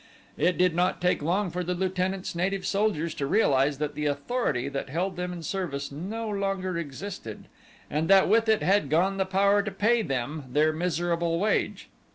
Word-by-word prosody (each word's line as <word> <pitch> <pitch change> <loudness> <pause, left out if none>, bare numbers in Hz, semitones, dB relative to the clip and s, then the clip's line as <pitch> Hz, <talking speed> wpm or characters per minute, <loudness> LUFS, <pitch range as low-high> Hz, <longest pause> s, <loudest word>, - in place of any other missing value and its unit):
It 180 0 +1
did 180 -1 +3
not 180 +2 +1
take 180 -3 +1
long 180 +4 0
for 180 +1 -2
the 180 +1 -2
lieutenant's 185 +1 -2
native 185 +2 -1
soldiers 195 -6 0
to 140 - -3
realize 140 -7 +3
that 150 0 -2
the 150 0 -2
authority 145 - -1
that 140 -1 -4
held 180 +6 -2
them 180 0 -3
in 175 -2 -7
service 150 -7 -3
no 205 +10 -5
longer 195 -3 -2
existed 165 - -6 0.4
and 155 +2 -1
that 195 -1 +6
with 225 +2 +3
it 220 - +3
had 195 -6 +2
gone 185 +6 +2
the 190 -1 0
power 200 +2 +3
to 210 - -4
pay 225 +4 +2
them 140 - -3
their 150 +4 +2
miserable 170 0 0
wage. 210 +3 0
180 Hz, 185 wpm, -27 LUFS, 155-195 Hz, 0.4 s, that